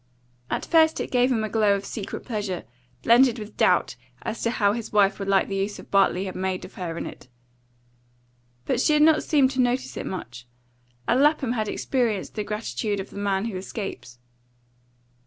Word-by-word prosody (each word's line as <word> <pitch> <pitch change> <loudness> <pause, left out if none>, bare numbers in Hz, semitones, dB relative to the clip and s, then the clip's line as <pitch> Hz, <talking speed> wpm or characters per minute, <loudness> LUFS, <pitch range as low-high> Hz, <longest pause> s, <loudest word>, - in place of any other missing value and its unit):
At - - -2
first 320 -1 +4
it - - -4
gave 250 +1 +3
him 225 -3 +1
a - - -1
glow 210 -2 +3
of 200 0 -5
secret 200 -1 -6
pleasure, 205 -6 -3 0.4
blended 240 +1 +5
with 210 -1 -8
doubt - - +2 0.3
as 225 0 -4
to 230 - +1
how 205 -3 +2
his 230 -1 -5
wife 205 -1 +3
would 195 - -4
like 195 -1 +3
the 195 - -3
use 200 +1 -2
Bartley 195 -1 +2
had 190 - -6
made 185 0 -2
of 185 - -13
her 170 -3 -5
in - - -4
it. - - -10 1.4
But 245 - 0
she 305 - +3
had 300 0 +5
not 315 0 +5
seemed 275 -4 +3
to 260 -1 +1
notice 250 +1 0
it - - -4
much, 125 -9 -7 0.6
and 255 - +3
Lapham 290 -4 +3
had 220 -3 -1
experienced 230 -4 -1
the 210 - -3
gratitude 210 0 -3
of 190 - -7
the 200 - -7
man 200 0 0
who 220 -5 -4
escapes. 185 - -6
210 Hz, 195 wpm, -25 LUFS, 195-245 Hz, 1.4 s, blended